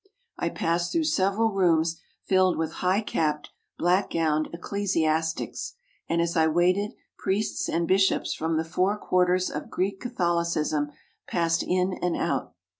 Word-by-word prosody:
I - - 0
passed 170 +1 -1
through 330 - +1
several 220 -4 +2
rooms 165 -4 +2 0.2
filled 185 -1 +3
with 160 0 -2
high 185 +3 +2
capped, 150 -7 -1 0.3
black 180 +3 +2
gowned 155 -2 0
ecclesiastics, 165 - -1 0.3
and 170 - +1
as 170 +1 -2
I 160 -1 +4
waited 180 +6 +2 0.2
priests 200 +3 -1
and 170 0 0
bishops 195 +2 +2
from 160 0 -1
the 160 - 0
four 185 +5 +1
quarters 180 -2 +2
of 150 - -5
Greek 195 +1 -1
Catholicism 170 - 0 0.4
passed 165 -1 +1
in 185 +1 +1
and 180 -1 0
out. - - -2
175 Hz, 140 wpm, -26 LUFS, 165-190 Hz, 0.4 s, I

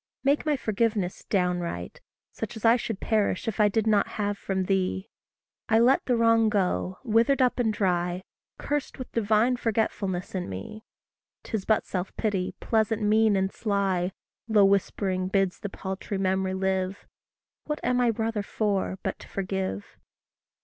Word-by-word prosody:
Make 285 +3 +2
my 295 -2 +2
forgiveness 215 -5 -1
downright 175 - -1 0.3
such - - -6
as 220 - -5
I 225 +1 +7
Should 225 -4 -3
perish 215 -1 0
if 220 - -3
I 210 -1 +5
did 220 +1 0
not 210 -2 +3
have 205 -1 0
from 190 -1 -2
thee; 190 0 -1 0.6
I 220 - +5
let 245 +4 +4
the 250 - +2
wrong 230 -1 +4
go, 185 -2 0
withered 230 +4 +3
up 255 -1 +2
and 225 -3 +2
dry, 180 -3 0 0.3
Cursed 295 -1 -3
with 255 - -7
divine 225 +3 +2
forgetfulness 205 -5 -1
in 185 - -3
me. 95 - -7 0.6
'Tis 220 -5 -3
but 220 -2 +2
self 185 0 -4
pity, 195 -4 -1
pleasant, 220 -1 +1
mean, 215 0 +4
and 190 0 +1
sly, 195 -4 0 0.4
Low 210 -3 +5
whispering 190 -1 +1
bids 195 -1 +1
the 205 - -5
paltry 190 +1 -5
memory 190 0 0
live: 190 0 -1 0.6
What 300 0 -3
am 250 0 +2
I 245 - +4
brother 225 -1 -1
for, 200 -2 -1
but - - -3
to - - -12
forgive! 190 - -4
205 Hz, 155 wpm, -27 LUFS, 190-225 Hz, 0.6 s, I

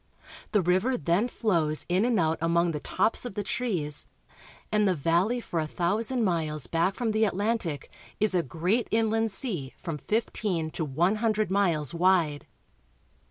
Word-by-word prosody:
The 210 -4 +2
river 190 +9 +2
then 170 - +1
flows 165 -11 +1
in 185 +5 +2
and 240 -4 +2
out 160 -1 +1
among 170 +1 +2
the 150 - -3
tops 220 - 0
of 245 -6 -6
the 205 - -2
trees, 180 -10 -2 0.6
and 210 -1 +3
the 185 - +2
valley 170 - +1
for 175 -7 -3
a 155 - -1
thousand 215 +10 0
miles 155 -6 -1
back 170 +4 0
from 235 -3 -1
the 215 +1 +2
Atlantic 200 - -1 0.3
is 215 -1 +3
a 180 - +3
great 180 - -1
inland 225 0 +1
sea 185 - -4
from 165 -4 -5
fifteen 200 -6 -1
to 160 - -3
one 170 +8 +1
hundred 215 -3 0
miles 175 -7 +1
wide. 170 -4 +2
185 Hz, 160 wpm, -27 LUFS, 165-220 Hz, 0.6 s, and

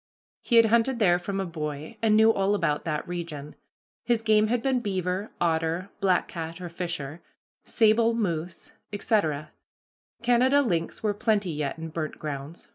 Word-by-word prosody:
He 240 - 0
had 230 -1 +8
hunted 235 +3 +2
there 175 -6 +4
from 195 +2 -3
a 190 - -1
boy, 155 +1 -5
and 220 -2 +4
knew 220 +1 +6
all 195 0 +1
about 150 -7 0
that 150 -2 -2
region. 165 -4 -6 0.5
His 235 -2 +1
game 215 -1 +4
had 235 +1 0
been 265 -2 +2
beaver, 190 -2 -2
otter, 165 +2 0
black 185 -2 +2
cat 165 0 -6
(or 180 -1 -6
fisher), 165 -3 -5 0.4
sable, 225 +1 +3
moose, 175 -6 -3 0.2
etc. 160 -8 0 0.7
Canada 255 +4 +4
lynx 170 -7 -2
were 210 -1 +1
plenty 205 -3 0
yet 150 -2 -3
in 165 0 -6
burnt 155 -1 -4
grounds. 150 +2 -6
185 Hz, 160 wpm, -26 LUFS, 160-220 Hz, 0.7 s, had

